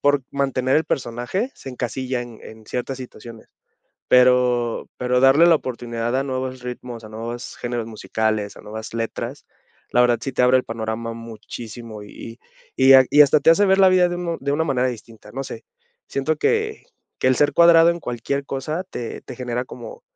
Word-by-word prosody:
por 145 -1 +2
mantener 135 -2 0
el 160 - +2
personaje 125 - -2
se - - -11
encasilla 125 0 -3
en 120 -2 -12
en 110 0 -12
ciertas 125 +2 -4
situaciones. 115 -2 -11 0.6
Pero 125 -2 +3
pero 125 0 +1
darle 135 +6 +6
la 170 -2 +6
oportunidad 120 -3 -3
a 135 - 0
nuevos 130 -1 -4
ritmos, 125 -2 -7
a 110 - -10
nuevos 115 +3 -6
géneros 120 -2 -3
musicales, 110 -1 -2
a - - -12
nuevas 110 +1 -8
letras, 115 0 -4 0.5
la 125 - +4
verdad 120 -1 +3
sí 135 - -4
te 125 - 0
abre 125 +1 +5
el 125 - -1
panorama 115 0 -4
muchísimo 115 0 -9
y 115 +3 -10 0.4
y 130 - +4
y 135 - +10
ha 130 -1 +8
y 150 - +8
hasta 150 +1 +5
te 145 - +6
hace 205 +5 +4
ver 190 - +4
la 190 -1 +6
vida 180 -1 +4
de 175 - -3
uno 170 -2 -3
de 140 +1 -2
una 155 +3 +1
manera 130 -4 +1
distinta, 115 -3 -9
no 135 +2 -4
sé. 115 -3 -8 0.4
Siento 150 +3 -1
que 440 - 0 0.3
que - - +2
el 130 - +4
ser 145 +2 +3
cuadrado 170 0 +7
en 170 - -5
cualquier 140 +2 -3
cosa 155 +7 -3
te 120 - -6
te 130 - -10
genera 125 -1 -3
como 480 - -10
125 Hz, 195 wpm, -22 LUFS, 115-140 Hz, 0.6 s, y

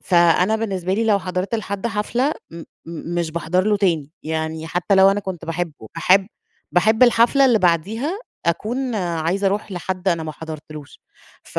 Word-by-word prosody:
فأنا 180 +4 +3
بالنسبة 190 -5 -2
لي 225 +3 0
لو 210 -3 +3
حضرت 185 +2 -3
لحد 200 0 -3
حفلة 235 +6 0 0.2
م 165 0 -9 0.5
مش 170 -2 -1
باحضر 170 +3 0
له 210 -1 +3
تاني، 165 -8 0
يعني 160 0 -3
حتّى 180 +4 0
لو 190 0 +7
أنا 200 +1 0
كنت 185 -4 -6
باحبه، 165 0 -3 0.2
باحب 185 +3 +4 0.5
باحب 220 +6 +3
الحفلة 245 +3 +5
اللي 245 -4 +4
بعديها 210 - 0 0.3
أكون 240 +9 -1
عايزة 175 +1 -1
أروح 205 +1 -1
لحد 185 +1 -3
أنا 170 -3 +1
ما 155 -1 -5
حضرتلوش، 155 -1 -10 0.4
ف - - -5
185 Hz, 160 wpm, -21 LUFS, 170-215 Hz, 0.5 s, لو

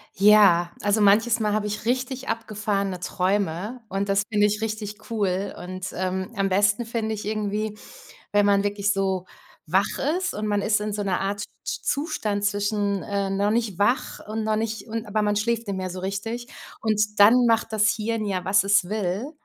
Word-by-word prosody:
Ja, 195 -4 +6
also 205 +1 +2
manches 220 +3 +4
Mal 210 -1 +1
habe 210 0 0
ich 210 +1 -4
richtig 255 +2 -2
abgefahrene 205 -4 -2
Träume 190 +4 -1
und 195 0 -2
das 195 +1 +2
finde 210 -1 +4
ich 210 +1 -1
richtig 215 -1 -5
cool 200 -3 -1
und, 185 +1 -6
ähm, 185 +3 -3
am 195 -2 0
besten 205 +4 +2
finde 225 -1 -2
ich 210 - -6
irgendwie, 210 0 -2 0.6
wenn 205 0 +4
man 200 0 +3
wirklich 205 0 0
so 190 -2 -1 0.4
wach 190 +5 +1 0.2
ist 375 0 -2
und 215 - -3
man 205 -1 0
ist 210 0 +2
in 210 0 -3
so 205 0 -2
'ner 195 -2 0
Art 200 +1 -2
Z 200 - -5 0.2
sch - - -3
zustand 210 -9 -1
zwischen, 205 -1 0
äh, 200 -1 -2
noch 200 +1 +1
nicht 220 -5 -1
wach 240 +6 +1
und 215 +1 -3
noch 215 0 +1
nicht 220 +1 -3
und 225 0 -3
aber 210 +1 -1
man 205 0 +1
schläft 230 +2 0
nicht 200 -1 -3
mehr 185 -1 -3
so 185 +1 -6
richtig. 225 +6 -4 0.3
Und 210 -1 0
dann 245 +5 +7
macht 225 -1 +2
das 215 0 +3
Hirn 225 0 -2
ja, 190 -3 -2
was 195 +1 +4
es 200 -2 +4
will 210 +4 -2
205 Hz, 195 wpm, -24 LUFS, 195-220 Hz, 0.6 s, dann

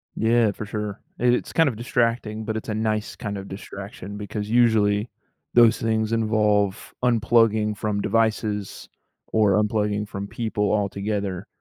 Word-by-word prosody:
Yeah, 115 -1 +3
for 105 - -7
sure. 105 -1 -4 0.2
I 125 - -1
it's 125 0 +2
kind 165 -3 +4
of 115 - -5
distracting, 115 -2 -1
but 110 0 -2
it's 110 - -6
a - - -1
nice 110 -1 -1
kind 100 -1 -5
of 95 0 -7
distraction 100 0 -8
because 105 0 -5
usually, 110 -2 +3 0.4
those 120 -1 +6
things 110 0 0
involve, 105 -2 +1
unplugging 115 -3 +3
from 105 0 -2
devices, 110 -3 -1 0.4
or 105 -3 +3
unplugging 105 -1 0
from 100 0 -5
people 105 -3 -1
altogether, 100 -2 -2
105 Hz, 145 wpm, -24 LUFS, 105-115 Hz, 0.4 s, those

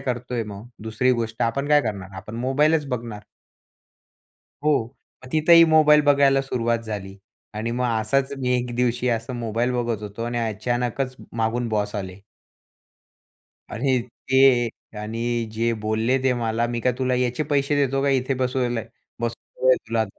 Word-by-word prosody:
करतोय 125 -2 -3
मग? 105 +2 -9 0.2
दुसरी 110 +3 +1
गोष्ट 115 -2 -2
आपण 140 +5 -1
काय 150 0 +6
करणार? 100 -3 -4
आपण 105 +4 -8
मोबाईलच 145 +5 +2
बघणार. 115 -4 -4 1.4
हो. 150 -5 +3 0.4
मग - - -10
तिथंही 165 +2 +7
मोबाईल 155 -2 +6
बघायला 140 -1 +4
सुरुवात 120 -3 0
झाली 105 -4 -6 0.4
आणि 110 +2 -3
मग 125 +2 -1 0.2
असाच 135 +6 0
मी 125 -1 0
एक 120 -1 -3
दिवशी 125 0 +1
असा 115 +1 -1
मोबाईल 120 0 -1
बघत 120 -3 -2
होतो 105 +2 -6
आणि 120 0 -2
अचानकच 120 +3 -2 0.2
मागून 115 +1 0
बॉस 105 -1 -1
आले. 95 -3 -5 1.6
आणि 130 +3 +1 0.3
ते 130 -3 +5 0.3
आणि 110 +2 -4 0.3
जे 115 +1 0
बोलले 110 +4 +1
ते 130 -1 +3
मला, 115 -1 0
"मी 120 0 -3
काय 125 +2 +2
तुला 130 -1 +1
याचे 125 +2 0
पैसे 140 0 +2
देतो 135 -1 +1
का 140 - +2
इथे 135 0 +1
बसयाला 125 -2 -1 0.4
बसवल 120 +2 -3
आहे 130 - +7
तुला. 115 -1 +1
120 Hz, 150 wpm, -23 LUFS, 115-130 Hz, 1.6 s, तिथंही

